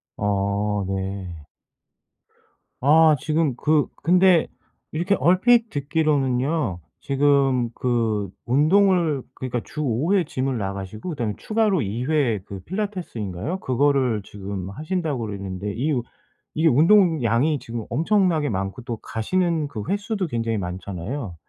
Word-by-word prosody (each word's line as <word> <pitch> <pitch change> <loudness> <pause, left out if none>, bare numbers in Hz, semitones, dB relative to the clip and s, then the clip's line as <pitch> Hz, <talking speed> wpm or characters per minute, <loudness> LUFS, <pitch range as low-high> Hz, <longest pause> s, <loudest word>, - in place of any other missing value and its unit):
아 100 0 0
네. 95 0 -3 1.5
아 155 +2 +6
지금 155 -4 0
그 150 +2 +2 0.2
근데 180 0 +5 0.4
이렇게 175 +6 +1
얼핏 220 - +4
듣기로는요. 140 - 0 0.3
지금 135 -3 +3
그 115 -6 0 0.2
운동을 160 +2 +3
그러니까 125 -2 -4
주 150 - -6
5 140 - 0
회 190 -3 +4
GYM을 130 -3 -2
나가시고 100 - -5
그다음에 115 -9 -2
추가로 215 -6 +1
2 115 +4 -3
회 135 -9 +1
그 100 -1 -8
필라테스인가요? 180 - -4
그거를 130 -4 +1
지금 100 -2 -6
하신다 155 - -2
그랬는데 100 -2 -4
이 145 +7 -1
우 120 - -1 0.5
이게 160 +1 +2
운동량이 155 - +4
지금 115 -1 -6
엄청나게 165 - +2
많고 95 +4 -3
또 120 -2 -4
가시는 160 +8 -1
그 110 -7 -6
횟수도 200 0 -1
굉장히 115 -4 -1
많잖아요. 95 +4 -5
135 Hz, 270 characters per minute, -23 LUFS, 105-160 Hz, 1.5 s, 아